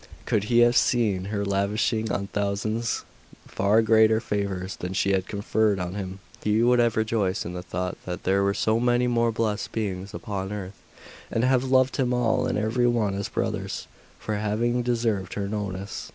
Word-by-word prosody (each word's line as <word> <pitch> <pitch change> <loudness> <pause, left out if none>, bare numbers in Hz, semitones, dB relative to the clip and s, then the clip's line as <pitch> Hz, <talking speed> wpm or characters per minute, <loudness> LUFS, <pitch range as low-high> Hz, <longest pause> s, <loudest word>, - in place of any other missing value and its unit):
Could 105 -1 +1
he 120 +2 +4
have 120 0 +5
seen 105 -9 +2
her 100 0 -2
lavishing 105 +2 0
on 100 - -1
thousands 105 +3 -2 0.4
far 105 +3 +2
greater 110 0 +5
favours 100 -4 -3
than 90 +1 -5
she 100 +1 +1
had 95 -1 0
conferred 105 0 +1
on 90 0 -3
him, 95 -2 -5 0.3
he 105 +2 +2
would 125 0 +4
have 120 -2 +2
rejoiced 110 -3 0
in 85 - -5
the 90 - -5
thought 90 +1 -4
that 90 +1 -5
there 95 +1 +2
were 100 0 +1
so 110 +1 +1
many 120 +1 +2
more 120 -1 +2
blest 110 -2 -2
beings 100 -3 -3
upon 100 -4 -4
earth, 100 -2 -7 0.5
and 115 - 0
have 130 0 +3
loved 130 0 +3
them 125 -3 +1
all 115 -2 +1
and - - -1
every 110 +4 +1
one 115 -5 +1
as 100 +1 -3
brothers, 100 -4 -3 0.3
for 110 -1 -3
having 115 +4 0
deserved 115 -6 -1
her 100 -1 -2
notice. 100 -2 -4
105 Hz, 180 wpm, -25 LUFS, 100-115 Hz, 0.5 s, have